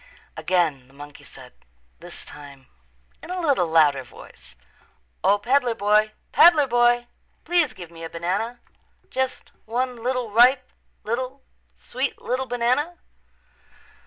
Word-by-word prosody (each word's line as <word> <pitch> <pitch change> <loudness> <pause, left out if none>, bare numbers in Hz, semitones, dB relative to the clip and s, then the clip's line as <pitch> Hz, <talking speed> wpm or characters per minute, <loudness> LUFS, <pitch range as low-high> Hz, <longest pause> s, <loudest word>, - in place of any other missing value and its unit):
Again 160 -8 0
the 135 - -22
monkey 145 +1 -12
said, - - -14 0.5
this - - -10
time 140 -2 -12 0.6
in - - -11
a 365 0 -3
little 280 - +1
louder 155 -4 +3
voice, 60 - -16 0.7
"O, 205 - +4
peddler 245 +2 +1
boy, 210 +1 +2 0.2
peddler 325 -4 +6
boy, 240 -1 +3 0.4
please 340 -6 +2
give 175 -3 -10
me 165 -1 -11
a 165 - -6
banana, 195 +9 -3 0.5
just 260 0 -3
one 250 +3 -2
little, 245 -1 -3
ripe 250 +3 +5 0.4
little, 255 +4 -4 0.3
sweet 260 +2 -4
little 255 +1 -3
banana." 250 +8 0
235 Hz, 125 wpm, -23 LUFS, 170-260 Hz, 0.7 s, peddler